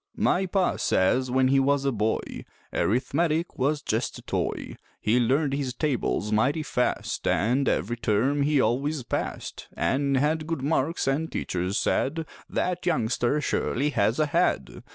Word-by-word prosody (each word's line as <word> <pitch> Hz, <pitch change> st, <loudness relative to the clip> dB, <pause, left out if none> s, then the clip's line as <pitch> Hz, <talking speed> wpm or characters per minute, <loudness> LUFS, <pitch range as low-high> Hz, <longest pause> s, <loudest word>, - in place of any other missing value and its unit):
My 190 Hz, +1 st, +1 dB
Pa 185 Hz, 0 st, +1 dB
says 125 Hz, +8 st, +2 dB
when 130 Hz, +1 st, +3 dB
he 135 Hz, 0 st, +4 dB
was 140 Hz, +1 st, +2 dB
a 135 Hz, -, +2 dB
boy 110 Hz, -1 st, -2 dB, 0.3 s
Arithmetic 155 Hz, -, 0 dB
was 145 Hz, +3 st, +1 dB
just 115 Hz, -1 st, -1 dB
a -, -, -12 dB
toy; -, -, -3 dB, 0.2 s
He 110 Hz, +4 st, +2 dB
learned 135 Hz, +4 st, +2 dB
his 135 Hz, -3 st, -2 dB
tables 125 Hz, -7 st, -1 dB
mighty 130 Hz, +9 st, +2 dB
fast 125 Hz, -4 st, -1 dB
An' 125 Hz, +6 st, +2 dB
every 110 Hz, +10 st, 0 dB
term 125 Hz, +6 st, +1 dB
he 145 Hz, 0 st, +2 dB
always 135 Hz, +5 st, 0 dB
passed, -, -, -4 dB
An' 140 Hz, 0 st, +1 dB
had 155 Hz, +3 st, +1 dB
good 165 Hz, -5 st, -3 dB
marks, 150 Hz, +1 st, 0 dB
an' 145 Hz, +4 st, +1 dB
teachers 90 Hz, -, -2 dB
said: 160 Hz, +4 st, 0 dB, 0.2 s
"That 180 Hz, 0 st, -1 dB
youngster 130 Hz, -3 st, +1 dB
surely 145 Hz, +1 st, 0 dB
has 110 Hz, -1 st, +1 dB
a 155 Hz, -, +3 dB
head." 100 Hz, -, 0 dB
135 Hz, 155 wpm, -26 LUFS, 120-150 Hz, 0.3 s, he